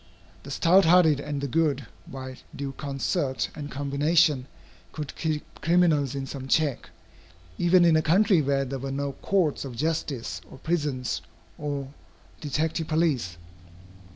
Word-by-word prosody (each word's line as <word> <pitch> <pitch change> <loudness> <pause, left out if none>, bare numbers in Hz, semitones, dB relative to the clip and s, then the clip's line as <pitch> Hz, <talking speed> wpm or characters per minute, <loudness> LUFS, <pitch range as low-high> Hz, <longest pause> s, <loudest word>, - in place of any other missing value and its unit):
The 140 - -11
stout 170 +7 +4
hearted 160 -4 +5
and 145 -1 -4
the 140 - -1
good, 140 -1 +1 0.2
by 130 -1 -7 0.2
due 140 -1 -4
concert 135 0 -2
and 145 -2 -7
combination, 145 0 +2 0.5
could 150 -2 -6
keep 155 -2 -2 0.2
criminals 160 -5 +3
in 135 -1 -3
some 135 0 -7
check, 145 -2 +1 0.7
even 175 0 +5
in 165 -2 +5
a 155 - +4
country 185 +2 +4
where 140 -1 +1
there 135 +1 -4
were 135 +1 -4
no 140 +1 -2
courts 175 0 0
of 130 -3 -7
justice, 130 - -2
or - - -12
prisons, 135 - -1 0.4
or 140 -2 -4 0.5
detective 155 +2 -1
police. 145 - 0
145 Hz, 140 wpm, -26 LUFS, 135-160 Hz, 0.7 s, hearted